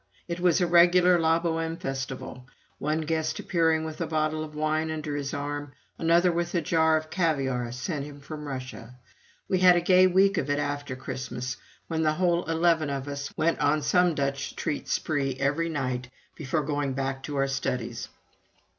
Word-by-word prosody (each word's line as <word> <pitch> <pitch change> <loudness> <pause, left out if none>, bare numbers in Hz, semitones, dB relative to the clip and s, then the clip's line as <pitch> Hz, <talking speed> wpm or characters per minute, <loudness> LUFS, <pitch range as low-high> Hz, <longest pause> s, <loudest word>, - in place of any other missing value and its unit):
It 170 0 -4
was 175 -2 +3
a 180 - +3
regular 175 +1 +5
"La 165 0 +3
Bohême" 165 0 -2
festival 135 -2 -5 0.3
one 155 +2 0
guest 160 0 -1
appearing 160 -2 +1
with 160 +1 -6
a 165 - -1
bottle 155 0 0
of 150 -1 -9
wine 155 +1 0
under 155 -2 -3
his 140 -1 -3
arm, 145 0 -4 0.3
another 170 +2 +4
with 170 +1 -2
a 170 - +2
jar 160 -1 +3
of 155 0 -6
caviare 135 -9 0
sent 140 +4 -3
him 145 -1 -10
from 150 +1 -8
Russia. 130 -3 -7 0.5
We 185 - +1
had 180 -1 +7
a - - +4
gay 185 +1 +5
week 195 +1 +3
of 145 - -3
it 145 - +1
after 145 -2 -3
Christmas, 130 -1 -5 0.3
when 160 -1 -1
the 155 -1 +2
whole 175 +1 +1
eleven 165 -1 +2
of 135 0 -3
us 140 0 -5
went 170 +1 +1
on 150 +1 +2
some 180 +2 +3
Dutch 140 -1 -2
treat 150 - -3
spree 140 -4 -1
every 145 +5 0
night, 130 -5 -3 0.3
before 150 +1 -1
going 145 -1 -1
back 135 0 -2
to 145 +1 -6
our 135 0 +1
studies. 125 -3 -3
155 Hz, 180 wpm, -27 LUFS, 140-165 Hz, 0.5 s, had